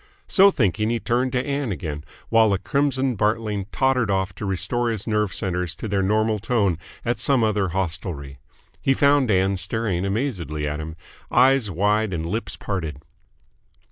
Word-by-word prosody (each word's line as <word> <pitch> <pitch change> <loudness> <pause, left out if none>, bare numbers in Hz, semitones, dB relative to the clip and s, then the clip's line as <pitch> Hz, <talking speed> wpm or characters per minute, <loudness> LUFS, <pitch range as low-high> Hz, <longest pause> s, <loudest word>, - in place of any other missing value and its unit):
So 195 0 +6
thinking, 110 - +1
he 120 0 0
turned 125 +3 0
to 125 0 0
Ann 140 -4 -2
again, 75 -3 -4 0.3
while 115 -1 +5
the 100 - +2
crimson 135 +2 0
Bartling 105 -1 0
tottered 130 -4 +1
off 95 -1 0
to 100 - -5
restore 100 +6 -1
his 110 -4 -3
nerve 105 -3 0
centres 90 -4 -2
to - - -6
their 100 -1 0
normal 110 +2 +1
tone 100 -6 +1 0.3
at 120 +1 0
some 135 -4 +3
other 105 -3 +1
hostelry. 80 -6 -4 0.4
He 135 - +2
found 140 -3 +3
Ann 95 0 +2
staring 95 -1 -1
amazedly 95 - -2
at 75 +1 -3
him, 80 +1 -6 0.3
eyes 130 -2 +4
wide 105 +3 +1
and 80 -1 -2
lips 105 +7 -3
parted. 80 -8 -4
105 Hz, 165 wpm, -23 LUFS, 95-120 Hz, 0.4 s, So